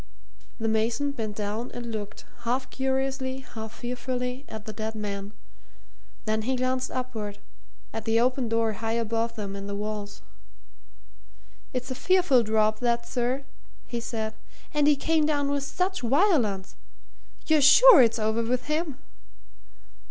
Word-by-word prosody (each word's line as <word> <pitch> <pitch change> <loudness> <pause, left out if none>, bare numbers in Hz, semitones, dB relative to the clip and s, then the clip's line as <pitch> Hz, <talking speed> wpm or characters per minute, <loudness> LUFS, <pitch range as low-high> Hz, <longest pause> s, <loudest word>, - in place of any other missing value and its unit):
The 225 - -1
mason 225 +6 +1
bent 220 -6 -4
down 215 +4 -3
and 240 -1 -5
looked, 210 -1 -6
half 245 +3 -2
curiously, 265 0 -1
half 220 -4 -8
fearfully, 250 +2 -4
at 215 -1 -8
the 215 - -6
dead 220 0 -4
man. 200 -1 -4 0.9
Then 215 0 0
he 260 +4 0
glanced 255 0 0
upward 225 -5 -4 0.6
at 225 0 -5
the 225 0 +3
open 250 0 +1
door 230 -1 +1
high 225 +2 -2
above 230 0 -1
them 200 -3 -5
in 200 0 -6
the 200 - -3
walls. 205 0 -5 1.5
"It's 255 0 -4
a - - 0
fearful 355 -4 +4
drop, 215 -1 +2
that, 235 -1 0
sir," 250 +2 -1 0.4
he 240 - -4
said. 220 -2 -3 0.4
"And 295 -1 +3
he 295 - +6
came 310 +2 +2
down 285 -2 +1
with 285 0 0
such 370 +6 -1
violence. 245 - +2 0.7
You're 315 -2 +4
sure 395 - +9
it's 230 -2 +4
over 220 +1 +1
with 245 +2 0
him?" 305 -2 -1
235 Hz, 145 wpm, -27 LUFS, 220-265 Hz, 1.5 s, sure